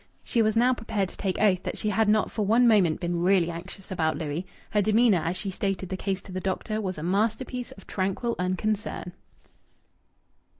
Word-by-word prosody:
She 235 - +1
was 215 0 +2
now 250 +2 +5
prepared 210 -5 -2
to - - -11
take 190 -2 -2
oath 195 -4 +3
that - - -4
she 215 - 0
had 215 +1 +2
not 215 0 +2
for 215 - -1
one 230 +4 +4
moment 190 -8 +4
been 175 -1 -1
really 180 -2 +3
anxious 185 +3 -9
about 160 -4 0
Louis. 155 +4 -3 0.2
Her 210 - +3
demeanour, 215 -1 +4
as 170 +3 -1
she 195 - -3
stated 190 -1 -2
the 190 - -2
case 195 0 -2
to - - -11
the 185 - -3
doctor, 215 +3 -2
was 185 -4 -3
a 155 - -5
masterpiece 225 +7 -1
of 195 - -16
tranquil 195 +5 -1
unconcern. 185 0 -2
195 Hz, 200 wpm, -27 LUFS, 180-215 Hz, 0.2 s, now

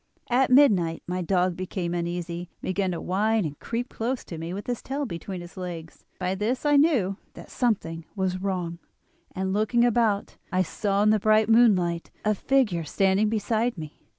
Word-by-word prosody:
At 255 +2 +3
midnight 205 - +4
my 180 +1 -2
dog 180 0 +1
became 180 -1 -3
uneasy, 175 0 -3
and - - -44
began 190 0 0
to 175 - -3
whine 215 +2 +1
and 145 -2 -6
creep 240 +2 -3
close 245 +3 -3
to 165 - -7
me 165 +1 -5
with 200 +3 -5
his 245 -2 -3
tail 280 +2 -3
between 180 -2 -6
his 175 +2 -12
legs; 170 -3 -7
by 180 0 -1
this 220 +9 -2
I 290 0 +4
knew 265 - +3 0.2
that - - -12
something 165 -9 -1
was 185 -2 -1
wrong, 180 -3 -2 0.6
and, 190 0 -1
looking 220 +3 +2
about, 225 -4 +1
I 185 0 +2
saw 200 +3 0
in 215 - +5
the 215 - +3
bright 215 +1 +3
moonlight 185 -8 +3 0.2
a 215 - +3
figure 210 -6 +1
standing 195 +6 +2
beside 225 +1 0
me. 155 -2 -7
195 Hz, 180 wpm, -26 LUFS, 175-225 Hz, 0.6 s, in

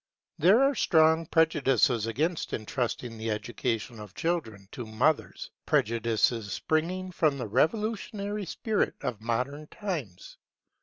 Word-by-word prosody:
There 195 - +6
are 275 +1 +4
strong 160 - +3
prejudices 135 -9 +3
against 155 +9 -1
entrusting 120 -1 -3
the 110 +1 -3
education 115 +1 -3
of 105 -3 -10
children 115 - -2
to 120 -3 -7
mothers: 125 +8 0 0.2
prejudices 115 -1 +1
springing 180 +4 -1
from 155 -5 +1
the 125 - -3
revolutionary 205 - -1
spirit 215 +4 -1
of 110 -4 -4
modern 125 +6 -2
times. 155 - -6
140 Hz, 115 wpm, -28 LUFS, 115-170 Hz, 0.2 s, There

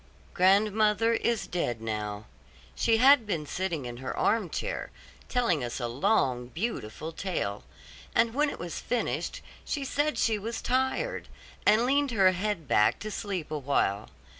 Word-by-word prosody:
Grandmother 210 +4 +3
is 230 -1 0
dead 120 -10 -2
now. 105 -1 -4 0.5
She 225 - +2
had 260 -1 +6
been 165 -7 -2
sitting 165 -3 -3
in 120 -1 -6
her 130 +1 -5
arm 215 -5 +1
chair, - - -3 0.4
telling 230 - +1
us 120 +1 -4
a 120 - -2
long, 125 - +1
beautiful 160 - -4
tale; 165 - -3 0.5
and 230 0 +3
when 295 +3 +2
it - - -6
was 170 -1 -5
finished, 245 -1 -2 0.2
she 280 -2 -3
said 290 +3 0
she 220 -2 +2
was 225 +3 -4
tired, 265 - -1 0.4
and 220 +3 +5
leaned 280 +2 +2
her 195 -5 +4
head 185 -4 -2
back 105 - +3
to 215 - -5
sleep 190 -8 -4
awhile. 135 -9 0
195 Hz, 150 wpm, -28 LUFS, 140-230 Hz, 0.5 s, had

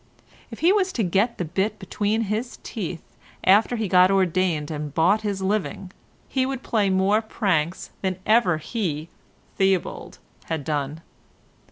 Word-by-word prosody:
If - - -10
he 345 +4 +5
was 385 -3 +1
to 230 - 0
get 200 +6 +1
the 180 - -2
bit 190 +6 -1
between 210 +3 -1
his 220 +3 -3
teeth 180 -6 -5 0.4
after 210 +5 +4
he 225 - -2
had 200 - -3
got 180 0 +6
ordained 185 -5 +1
and 150 -1 -4
bought 180 +8 +3
his 200 -3 -3
living, 195 -1 -2 0.4
he 265 - 0
would 265 -1 -3
play 210 -4 +1
more 190 +3 +3
pranks 185 -7 -1
than 190 -2 -1
ever 215 -7 +4
he, 160 -3 -3 0.5
Theobald, 190 -2 0 0.3
had 160 -3 -3
done. 150 +1 -3
190 Hz, 155 wpm, -24 LUFS, 170-220 Hz, 0.5 s, got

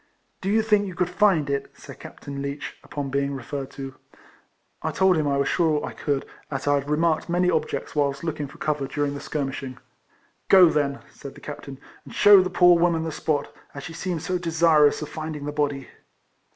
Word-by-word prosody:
" - - -45
Do 190 - -2
you 220 +2 +3
think 210 -2 +2
you 185 - -7
could 180 0 -1
find 180 -6 +3
it?" 140 -1 -2
said - - -12
Captain 140 0 -8
Leech, 140 +1 -5
upon 140 -2 -5
being 140 0 -1
referred 135 +1 -5
to. 135 -1 -7 0.9
I - - -1
told 190 -1 +3
him 155 -2 0
I 140 -1 +1
was 140 - +1
sure 160 -4 +1
I - - -5
could, 140 -3 -2 0.2
as 135 -2 -4
I 145 - +3
had 140 0 -1
remarked 160 +2 +1
many 180 +1 +2
objects 160 -1 -2
whilst 140 -1 0
looking 150 -3 -3
for - - -15
cover 150 -3 -1
during 145 0 -2
the 140 - -5
skirmishing. 135 -3 -4 0.4
" - - -39
Go 180 -3 +8
then," 140 -3 -1
said 140 - -10
the - - -12
captain, 145 -2 -8
" - - -26
and - - -12
shew 205 -2 +8
the 185 - -1
poor 175 -1 +5
woman 170 -2 +2
the 160 - -3
spot, 145 -1 -2 0.2
as 145 - -7
she 165 - -7
seems 170 -1 -3
so 180 -1 -1
desirous 160 -3 +3
of 150 - -7
finding 155 -2 -6
the 145 - -3
body." 145 -2 -2
150 Hz, 215 wpm, -24 LUFS, 140-170 Hz, 0.9 s, Go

